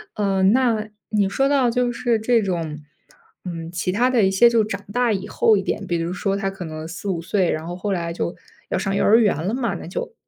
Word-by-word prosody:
呃， 195 -2 +1
那 220 0 +2 0.2
你 205 -3 +1
说 270 +7 +1
到 270 -4 +3
就 250 0 +1
是 235 -2 0
这 230 +1 +2
种 165 -6 -3 0.7
嗯， 165 -2 -6
其 180 +1 -2
他 245 +4 +3
的 250 -3 +3
一 190 - +4
些， 215 +5 +5
就 230 -1 +3
长 200 -1 -5
大 245 0 +2
以 195 -2 -3
后 220 - +3
一 195 - 0
点， - - -3
比 175 - 0
如 165 +1 -2
说， 195 +2 -1
他 195 -1 -1
可 195 -2 -7
能 155 0 -6
4、5 175 +1 -4
岁， 180 +1 +1
然 155 +1 -2
后 175 - -5
后 195 +2 -2
来 170 -2 -2
就 170 0 -3 0.3
要 - - -1
上 195 +1 -1
幼 200 - +1
儿 220 - +6
园 205 -9 +2
了 210 - -1
嘛， 235 -5 -1
那 170 - -8
就 195 - -5
195 Hz, 250 characters per minute, -22 LUFS, 175-230 Hz, 0.7 s, 儿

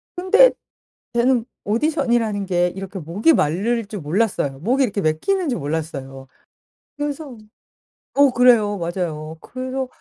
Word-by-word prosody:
근데 430 +8 +5 0.6
저는 240 0 +2 0.2
오디션이라는 235 -4 0
게 180 -1 +2
이렇게 195 +1 -7
목이 185 - +2
마를 215 - 0
줄 205 0 -7
몰랐어요. 150 -5 -1
목이 255 - +1
이렇게 205 -5 -1
막히는 305 - 0
줄 245 - -1
몰랐어요. 140 -3 -5 0.7
그래서 290 -2 -5 0.8
어 280 -1 +5
그래요. 235 -4 +4
맞아요. 165 -3 -4
그래서 260 +5 -5
215 Hz, 295 characters per minute, -21 LUFS, 170-260 Hz, 0.8 s, 근데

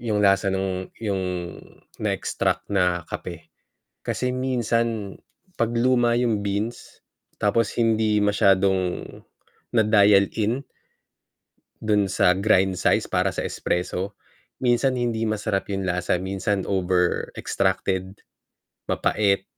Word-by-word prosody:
Yung 105 -3 0
lasa 100 +1 +4
nung 95 -1 -2
yung 95 -5 -3 0.5
na-extract - - -1
na 90 -3 +1
kape. 80 -1 -8 0.5
Kasi 125 - -1
minsan 115 -5 -1 0.4
'pag 115 0 +1
luma 120 0 +3
yung 115 -4 +1
beans, 105 +4 -4 0.4
tapos 110 +2 +1
hindi 110 -2 +2
masyadong 95 -2 +2 0.7
na-dial 105 -3 +5
in, 115 +5 0 1.2
do'n 105 -2 +2
sa 90 -1 +3
grind 95 -2 +3
size - - +2
para - - +1
sa - - -2
espresso, 90 +3 -2 0.5
minsan 125 +1 +2
hindi 115 -2 -1
masarap 105 -2 -1
yung 95 - -2
lasa, 90 0 0
minsan 95 +1 -1
over-extracted, 95 +1 -1 0.7
mapait, 100 -2 +1
100 Hz, 100 wpm, -24 LUFS, 95-115 Hz, 1.2 s, na-dial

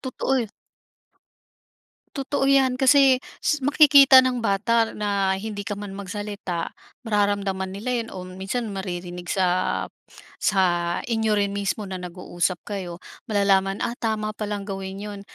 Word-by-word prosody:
totoo 265 0 -1
y 220 - -8 1.7
Totoo 275 0 -1
'yan 265 -2 +4
kasi 265 -1 +5 0.2
s 300 -2 +1
makikita 280 -2 +7
ng 250 -2 0
bata 225 +2 +1
na 200 -2 0
hindi 205 +1 -5
ka 205 - -2
man 205 -1 -7
magsalita, 200 -3 -5 0.3
mararamdaman 200 -3 0
nila 220 +5 -4
yun 225 - -7
o 185 -1 -6
minsan 190 +6 -4
maririnig 180 -2 -6
sa 190 -2 +1 0.9
sa 195 -2 +2 0.4
inyo 225 -2 0
rin 200 -1 0
mismo 200 +1 -2
na 190 -2 -6
nag-uusap 180 0 -3
kayo, 185 -4 -5 0.3
malalaman, 195 -2 +2
"Ah, 235 - -3
tama 215 -1 -2
pa 210 -1 -5
lang 205 -1 -4
gawin 195 -1 -6
yun." 205 -1 -7
205 Hz, 135 wpm, -24 LUFS, 190-230 Hz, 1.7 s, makikita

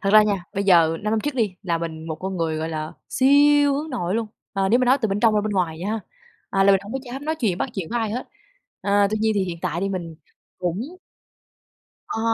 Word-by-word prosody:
Thật 195 - +1
ra 215 0 +9
nha, 200 -4 -1
bây 200 +1 -1
giờ 165 -4 +5
năm 210 - -1
năm 220 - +2
trước 295 +2 -3
đi 215 -7 0
là 170 -3 0
mình, 160 -1 -5
một 160 - -3
con 190 +3 -5
người 165 -2 -1
gọi 160 +1 -2
là 155 -1 -4 0.2
siêu 285 +1 +5
hướng 300 +2 -3
nội 190 -6 -2
luôn, 230 -1 0 0.3
ờ, 195 -1 +1
nếu 240 +5 +4
mà 255 - +2
nói 260 +3 +4
từ 220 - +2
bên 200 +1 -1
trong 225 -2 +4
ra 210 - +3
bên 210 0 -2
ngoài 170 -4 0
nha, 215 +5 -2 0.5
à, 195 0 +3
là 200 - +6
mình 195 - +3
hổng 205 - -8
có 270 - -1
dám 265 +3 -7
nói 315 +1 0
chuyện, 215 - -1
bắt - - -1
chuyện 185 -5 -4
với 240 - 0
ai 220 -2 -1
hết. 245 +3 -4 0.5
À, 200 0 +3
tuy 215 - 0
nhiên 220 0 +2
thì 195 - +1
hiện 175 -2 -5
tại 170 -1 -1
thì 195 - 0
mình 175 -4 -4 0.4
cũng 195 - -3 1.1
Ờ. 225 - -3
200 Hz, 265 wpm, -23 LUFS, 175-235 Hz, 1.1 s, ra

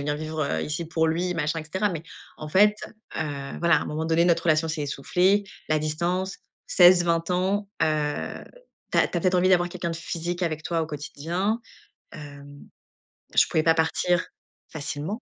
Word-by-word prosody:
venir 145 +1 -1
vivre, 155 0 -3
heu, 140 - -1
ici 155 +2 -3
pour 160 -1 +1
lui», 175 +2 0
machin 165 0 -1
et 155 - -10
cetera. 190 +6 -1
Mais 165 -4 -5 0.4
en 155 - -7
fait, 210 +5 +5 0.4
heu, 140 -3 -4
voilà, 170 0 +4
à - - 0
un - - -5
moment 155 +1 -3
donné, 165 +1 +3
notre 170 -1 +2
relation 160 -1 +2
s'est 155 -1 -2
essoufflée, 180 +8 +1 0.2
la 155 0 +2
distance, 175 +5 -2 0.3
16-20 175 -2 +5
ans. 195 +3 0
Heu, 150 -1 -1 0.5
tu - - +3
as - - +5
tu - - -4
as - - -4
peut-être 185 0 +1
envie 180 +1 +3
d'avoir 175 -1 +4
quelqu'un 175 -1 -4
de 165 - -4
physique 175 +2 -4
avec 160 -2 -2
toi 165 0 -1
au - - -3
quotidien, 165 +8 -3 0.5
hem, 145 -1 -11 0.7
je - - +7
pouvais 155 - +1
pas 165 - +5
partir 165 +2 +1 0.5
facilement. 160 - -4
165 Hz, 185 wpm, -25 LUFS, 155-180 Hz, 0.7 s, je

